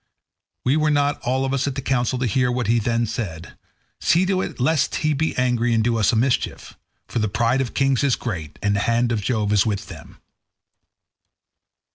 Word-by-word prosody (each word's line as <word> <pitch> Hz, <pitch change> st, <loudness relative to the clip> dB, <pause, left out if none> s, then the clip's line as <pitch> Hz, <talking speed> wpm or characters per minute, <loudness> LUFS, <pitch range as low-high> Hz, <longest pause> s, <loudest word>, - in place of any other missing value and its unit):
We 135 Hz, +4 st, +3 dB
were 155 Hz, 0 st, +2 dB
not 145 Hz, -1 st, +1 dB
all 130 Hz, +2 st, 0 dB
of 135 Hz, -, -2 dB
us 140 Hz, 0 st, 0 dB
at 140 Hz, -, -3 dB
the 135 Hz, -, -3 dB
council 130 Hz, -1 st, 0 dB
to 130 Hz, -, -1 dB
hear 125 Hz, +2 st, +1 dB
what 125 Hz, -1 st, -1 dB
he 115 Hz, +3 st, +2 dB
then 115 Hz, +1 st, 0 dB
said; 100 Hz, -7 st, -5 dB, 0.4 s
see 175 Hz, +3 st, +3 dB
to 185 Hz, 0 st, +1 dB
it -, -, -6 dB
lest 145 Hz, +3 st, +1 dB
he 155 Hz, -, +3 dB
be 155 Hz, +3 st, -1 dB
angry 120 Hz, -2 st, +1 dB
and 110 Hz, -, +2 dB
do 120 Hz, 0 st, +1 dB
us 105 Hz, -, +3 dB
a -, -, 0 dB
mischief; 125 Hz, +3 st, -1 dB, 0.3 s
for -, -, -2 dB
the 110 Hz, -1 st, 0 dB
pride 120 Hz, +6 st, +1 dB
of 125 Hz, -, -4 dB
kings 135 Hz, -1 st, +2 dB
is 140 Hz, -3 st, +3 dB
great, 85 Hz, -10 st, -6 dB
and 100 Hz, 0 st, +2 dB
the -, -, +1 dB
hand 120 Hz, +1 st, +2 dB
of 110 Hz, -3 st, 0 dB
Jove 105 Hz, -1 st, 0 dB
is 100 Hz, -3 st, +4 dB
with 105 Hz, -3 st, -3 dB
them." -, -, -12 dB
120 Hz, 210 wpm, -22 LUFS, 110-135 Hz, 0.4 s, is